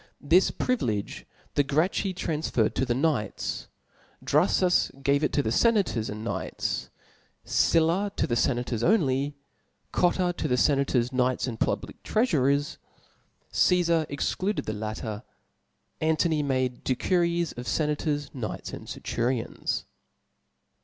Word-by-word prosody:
This 170 +6 +4
privilege 120 - -2 0.3
the - - +3
Gracchi 155 +8 +1
O - - -3 0.2
ansferred 150 -8 0
to 130 - 0
the 120 - +1
knights; 135 -7 -1 0.6
Drufus 180 -1 +3
gave 140 +2 +2
it 150 - +1
to 145 - +2
the 110 - -1
ienators 195 - +2
and 105 +1 -6
knights 115 - -3 0.6
^ - - -25
Sylla 170 +5 +2
to - - +1
the 120 - -2
fenators 120 -1 0
only; 145 - +2 0.6
Cotu 180 0 +2
to - - -2
the 125 - +2
fenators» 135 -2 +2
knights, 125 0 +1
and 115 -4 -5
public - - -2
treafu* 215 - +1
rers; 140 +1 +1 0.7
Casfar 170 -3 +3
excluded 185 +8 -1
the 110 - -2
latter 110 0 -4 0.8
3 155 - 0
Antony 160 -1 +2
made 130 -3 -1
de 130 - +1
XMxitH 170 +2 +1
of 120 0 -7
fenators, 150 +1 -1
knights, 120 -5 -5
and - - -8
denturions. 120 0 -2
145 Hz, 135 wpm, -27 LUFS, 125-170 Hz, 0.8 s, This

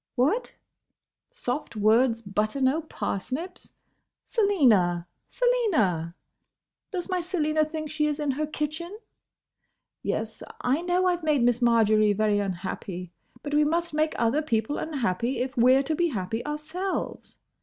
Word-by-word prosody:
—What? 305 - +1 0.7
soft 300 - -4
words 230 +2 +3
butter 210 +5 -1
no 270 +4 +2
parsnips?—Selina, 270 - -1 0.2
Selina—! 270 - +1 0.7
Does 365 -3 -4
my 365 -2 0
Selina 315 -3 +1
think 310 -1 -5
she 300 0 +1
is 300 0 -2
in 295 -2 0
her 300 +3 -2
kitchen?—Yes; 305 - -7 0.2
I 265 +6 +1
know 355 +1 +1
I 360 -1 +3
've 340 - -18
made 300 -5 +2
Miss 245 0 +2
Marjory 215 -3 +4
very 210 0 +2
unhappy; 185 -2 -4 0.3
but 290 - -4
we 300 +1 +5
must 335 +2 0
make 310 +1 +1
other 235 +6 +2
people 230 -2 -1
unhappy, 250 - -1
if 255 +3 -2
we 250 +1 +6
're 270 - +3
to 305 +3 -1
be 345 +3 +2
happy 225 - -3
ourselves. 315 +6 -4
285 Hz, 135 wpm, -26 LUFS, 220-320 Hz, 0.7 s, we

